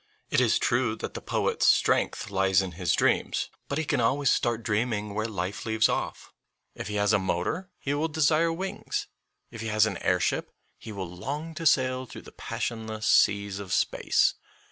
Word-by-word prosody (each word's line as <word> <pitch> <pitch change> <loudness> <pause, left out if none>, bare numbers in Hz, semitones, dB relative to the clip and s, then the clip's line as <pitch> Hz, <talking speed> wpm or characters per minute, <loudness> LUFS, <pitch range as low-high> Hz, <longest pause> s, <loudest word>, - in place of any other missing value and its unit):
It - - +4
is - - +3
true 120 -2 +1
that - - -6
the - - -6
poet's - - 0
strength - - +2
lies 95 -1 +3
in 95 - -5
his 85 0 -1
dreams, - - +1 0.2
but 140 - -2
he 160 - -1
can 125 - +1
always 135 +4 +2
start 115 -1 0
dreaming 105 -2 -1
where 110 +2 -1
life 95 -2 -4
leaves 110 -1 +3
off. - - -3 0.4
If - - -6
he 105 - -4
has 105 +1 +2
a 105 - +4
motor 95 - -2
he 140 - -2
will 150 +3 0
desire 160 +1 +2
wings; 190 +4 -3 0.5
if 115 - -8
he 115 - -4
has 110 0 +4
an 110 -3 -2
airship 90 -1 0 0.3
he 110 - -9
will 95 -3 -5
long 145 - -5
to 160 +1 -1
sail 130 -2 +2
through - - -10
the - - -13
passionless 110 -2 -4
seas 100 -1 +3
of 100 -3 -7
space. 85 - +2
110 Hz, 190 wpm, -27 LUFS, 100-140 Hz, 0.5 s, It